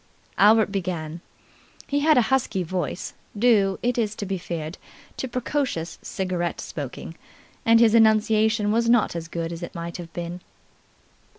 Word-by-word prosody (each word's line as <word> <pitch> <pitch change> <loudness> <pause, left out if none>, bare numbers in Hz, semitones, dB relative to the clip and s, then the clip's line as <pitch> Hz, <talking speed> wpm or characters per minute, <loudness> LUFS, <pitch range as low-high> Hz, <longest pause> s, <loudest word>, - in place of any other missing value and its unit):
Albert 215 +1 +5
began. 170 -4 -3 0.6
He 285 - 0
had 305 0 +4
a 245 - +5
husky 220 -8 +1
voice, 175 0 -3 0.2
due, 205 -4 +3
it 245 0 +1
is 215 -2 -1
to 205 - -5
be 190 -1 -3
feared, 165 -1 -5 0.4
to 265 - -3
precocious 250 - -2
cigarette 180 -3 -3
smoking, 145 +2 -6 0.5
and 230 0 +7
his 230 -2 +5
enunciation 220 -1 +4
was 230 +1 +2
not 235 -6 +3
as 165 -1 -4
good 165 0 -4
as 165 - -7
it 175 - -7
might 170 0 -5
have 170 -2 -9
been. 175 +1 -6
195 Hz, 155 wpm, -24 LUFS, 170-230 Hz, 0.6 s, and